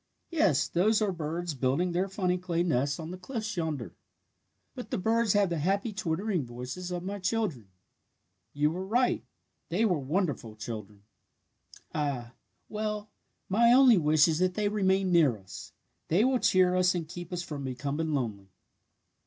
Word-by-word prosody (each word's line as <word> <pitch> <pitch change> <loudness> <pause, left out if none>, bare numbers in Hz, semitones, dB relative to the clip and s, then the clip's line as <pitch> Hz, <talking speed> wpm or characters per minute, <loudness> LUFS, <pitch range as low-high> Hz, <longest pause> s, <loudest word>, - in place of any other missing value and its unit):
"Yes, 175 - +2
those 210 +5 +2
are 210 -3 +1
birds 170 0 -3
building 135 +7 0
their 180 +3 0
funny 185 -2 -1
clay 175 -1 -1
nests 140 -3 0
on 160 +1 -6
the 180 - -7
cliffs 215 0 -4
yonder. 150 - -3 0.8
"But - - -8
the - - -1
birds 225 +2 +2
have 200 -3 +2
the 170 - -1
happy 200 +7 0
twittering 185 -1 -1
voices 125 +9 -6
of 175 -1 -4
my 200 +2 -4
children. 185 - -1 0.8
You 150 +1 +1
were 180 +3 -4
right. 240 +6 +1 0.5
They 190 +7 +2
were 180 -7 +2
wonderful 140 - -2
children! 105 -2 -7 0.9
"Ah, 135 -5 -2 0.3
well, 210 -1 -4 0.4
my 235 +5 +4
only 250 -5 +7
wish 155 0 +4
is 160 -1 0
that 185 0 +1
they 210 -1 +1
may - - -6
remain 190 -2 +2
near 155 -10 +4
us. 95 -2 -11 0.4
They 180 +7 +3
will 260 -1 +2
cheer 185 -3 +4
us 185 0 +3
and 165 -3 -3
keep 175 +1 -8
us 175 -1 -3
from 145 -4 -6
becoming 140 +5 -3
lonely!" 105 -7 -3
175 Hz, 165 wpm, -29 LUFS, 145-200 Hz, 0.9 s, only